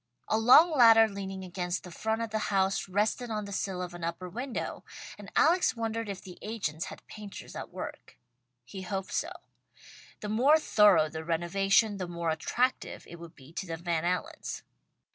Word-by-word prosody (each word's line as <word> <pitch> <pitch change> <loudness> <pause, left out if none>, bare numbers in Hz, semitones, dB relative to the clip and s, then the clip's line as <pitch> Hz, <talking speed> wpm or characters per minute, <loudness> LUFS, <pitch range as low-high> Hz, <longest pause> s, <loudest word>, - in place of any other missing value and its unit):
A 220 - +2
long 260 +9 +7
ladder 225 -3 +8
leaning 195 -2 -6
against 180 0 -3
the 180 - -10
front 220 +5 -2
of 225 - -5
the 220 - 0
house, 195 -1 +1
rested 215 +5 0
on 210 -2 -3
the 200 - -8
sill 190 -2 -2
of 180 -1 -7
an 175 -1 -8
upper 170 +2 -4
window, 245 +7 -5 0.3
and - - -12
Alex 345 -7 +4
wondered 225 -1 -3
if 195 -2 -6
the 180 -2 -11
agents 195 -6 -3
had - - -10
painters 210 -2 -10
at - - -6
work. - - -8 0.5
He 190 +9 -8
hoped 190 0 -4
so. - - -1 0.9
The 210 - -4
more 260 +9 +5
thorough 205 - +5
the 160 +1 -6
renovation, 195 +6 +2
the 185 -2 -4
more 170 -1 -2
attractive 245 +11 -1
it 170 - -11
would 170 -1 -11
be 140 +3 -16
to 190 - -5
the 165 -1 -4
Van 170 -1 -1
Allens. 240 - -3
195 Hz, 180 wpm, -29 LUFS, 175-225 Hz, 0.9 s, ladder